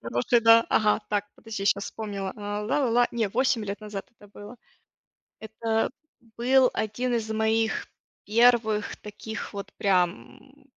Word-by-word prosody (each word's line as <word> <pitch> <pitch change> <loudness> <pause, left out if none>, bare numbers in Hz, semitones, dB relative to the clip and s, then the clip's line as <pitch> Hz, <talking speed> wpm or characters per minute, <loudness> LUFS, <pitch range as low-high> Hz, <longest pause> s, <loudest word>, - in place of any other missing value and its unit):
Хороший, 120 - +1
да. 230 0 +6
Ага, 210 0 +3
так, 205 -1 0
подожди, 215 -3 -6
щас 200 0 +2
вспомнила. 200 -3 -5
А, 205 0 -4
ла-ла-ла. 245 +1 +2
Не, 230 -3 -1
8 235 +1 +1
лет 200 0 -4
назад 205 -2 -7
это 205 - -17
было. 205 +3 -12 0.8
Это 220 +1 -2 0.5
был 255 +1 +4
один 240 +4 -2
из 220 -1 -2
моих 220 0 0 0.4
первых 220 -1 +3
таких 215 +2 -8
вот 200 0 -7
прям 195 +9 -1
220 Hz, 135 wpm, -26 LUFS, 205-230 Hz, 0.8 s, да